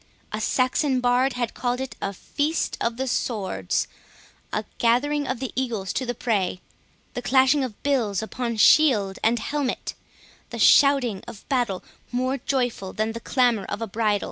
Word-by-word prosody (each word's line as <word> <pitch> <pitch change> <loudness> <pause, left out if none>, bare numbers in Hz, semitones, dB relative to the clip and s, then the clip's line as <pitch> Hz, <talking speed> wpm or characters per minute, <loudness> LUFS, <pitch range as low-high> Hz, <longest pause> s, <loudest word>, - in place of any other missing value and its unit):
A 215 - -3
Saxon 255 +3 +1
bard 250 +2 +2
had 240 -2 -2
called 245 0 -2
it 265 -1 -5
a 200 - -1
feast 290 - -2
of 230 0 -1
the 265 +1 -2
swords—a 210 - -3
gathering 285 +5 +2
of 255 - -2
the 265 - -4
eagles 225 -7 -2
to 260 - -2
the 245 - -2
prey—the 200 +2 -4
clashing 265 +3 +4
of 240 -5 -6
bills 225 -8 +1
upon 235 +1 -3
shield 210 -7 +5
and 230 +2 +3
helmet, 275 +3 -2 0.6
the - - -6
shouting 270 -8 +5
of 210 - -11
battle 245 -9 0 0.3
more 255 +2 -1
joyful 245 -7 -2
than 220 +1 -1
the 230 - -6
clamour 240 -4 +1
of - - -4
a 225 - -2
bridal. 210 -1 0
245 Hz, 155 wpm, -24 LUFS, 215-260 Hz, 0.6 s, shield